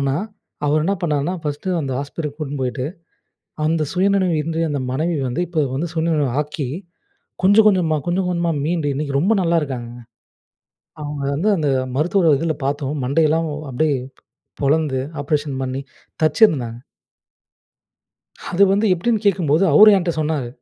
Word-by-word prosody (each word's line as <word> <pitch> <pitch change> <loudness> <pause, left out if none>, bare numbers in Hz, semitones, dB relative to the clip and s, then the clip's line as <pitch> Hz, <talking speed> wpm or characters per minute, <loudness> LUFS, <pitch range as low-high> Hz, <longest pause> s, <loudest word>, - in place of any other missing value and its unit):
ஆனா 135 -1 0 0.5
அவர் 150 +1 +2
என்னா 195 +4 +1
பண்ணாருன்னா, 150 +1 0
ஃபர்ஸ்ட்டு 150 +5 -3
அந்த 135 -3 -3
ஹாஸ்பித்திரிக்கு 145 +1 -5
கூட்டின்னு 145 -2 -4
போயிட்டு, 125 0 -2 0.8
அந்த 160 0 +1
சுயநினைவு 190 -1 +2
இன்றி 165 +1 -2
அந்த 145 -2 -2
மனைவி 160 +4 -1
வந்து, 125 +8 -2
இப்போ 160 -3 0
வந்து 160 +6 -2
சுயநினைவு 160 -3 +1
ஆக்கி 150 -2 -5 0.8
கொஞ்சம் 205 +3 +6
கொஞ்சமா, 180 -6 +2
கொஞ்சம் 180 +1 0
கொஞ்சமா 170 -1 0
மீண்டு, 165 -2 -1
இன்னைக்கு 140 -1 -1
ரொம்ப 195 +9 +3
நல்லா 170 -1 +2
இருக்காங்கங்க. 120 -4 -6 1.0
அவங்க 145 -1 -5
வந்து 170 +9 0
அந்த 155 -4 0 0.3
மருத்துவ 165 +1 +3
இதில 160 +1 -1
பார்த்தோம். 145 0 -2
மண்டையெல்லாம் 155 +4 +2 0.2
அப்படியே 145 +3 +1 0.7
பொளந்து, 145 -2 +1 0.2
ஆப்பரேஷன் 145 -1 -1
பண்ணி, 130 +1 -3 0.4
தச்சிருந்தாங்க. 150 - +3 1.7
அது 180 - +2
வந்து 205 +3 +2
எப்படீன்னு 215 +5 0
கேட்கும்போது, 175 -3 +3
அவரு 215 +8 +9
ஏன்ட்ட 175 -2 0
சொன்னாரு. 150 -5 -1
155 Hz, 135 wpm, -20 LUFS, 140-175 Hz, 1.7 s, அவரு